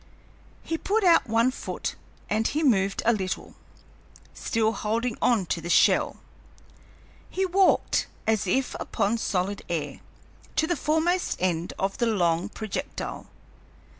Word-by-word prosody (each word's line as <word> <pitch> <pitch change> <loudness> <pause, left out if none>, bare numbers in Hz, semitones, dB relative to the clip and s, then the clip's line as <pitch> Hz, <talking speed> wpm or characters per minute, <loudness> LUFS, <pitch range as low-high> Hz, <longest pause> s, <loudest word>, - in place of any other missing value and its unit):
He 325 0 -3
put 430 +2 +1
out 340 -9 +5
one 230 +3 +3
foot - - -4 0.3
and 220 +2 +1
he 305 +3 -1
moved 200 -8 +2
a 235 - +5
little, 190 -4 -3 0.8
still 225 -1 0
holding 230 +2 -1
on 230 -6 +3
to 170 - -2
the 170 - -6
shell. - - +4 1.1
He 385 - 0
walked, 380 +1 +3 0.2
as 220 -3 +1
if 260 +8 0
upon 220 +1 -1
solid 195 -1 -1
air, 150 -5 -3 0.6
to 315 - +3
the 345 +2 0
foremost 330 +4 +1
end 175 -2 -1
of 195 0 -2
the 235 - +2
long 175 -3 +1
projectile. 215 -1 -5
220 Hz, 135 wpm, -26 LUFS, 190-285 Hz, 1.1 s, out